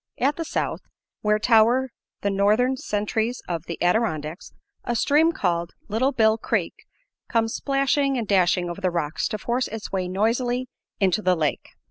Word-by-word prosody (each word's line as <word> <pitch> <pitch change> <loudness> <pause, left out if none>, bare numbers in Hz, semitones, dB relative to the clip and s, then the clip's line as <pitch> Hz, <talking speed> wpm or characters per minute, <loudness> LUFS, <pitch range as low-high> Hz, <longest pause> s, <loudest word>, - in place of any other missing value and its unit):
At 280 +3 +1
the 330 - -4
South, - - -2 0.4
where 210 0 +2
tower 235 +4 +3 0.3
the 200 - 0
northern 215 +7 +2
sentries 220 +1 -2
of 170 -2 -3
the 170 - -5
Adirondacks, 175 -4 -1 0.3
a 240 - -2
stream 300 +7 +3
called 170 - -1 0.2
Little 240 +6 +1
Bill 220 -3 +3
Creek - - -1 0.6
comes 225 -1 +1
splashing 275 0 +1
and 230 -3 -2
dashing 180 -2 +2
over 175 +3 -6
the 185 - +2
rocks 170 -3 -1
to 215 - -3
force 240 +5 -1
its 220 0 -7
way 185 -2 -1
noisily 240 +6 0 0.3
into 195 0 +2
the 185 -3 +3
lake. 155 -3 -2
220 Hz, 160 wpm, -24 LUFS, 185-250 Hz, 0.6 s, tower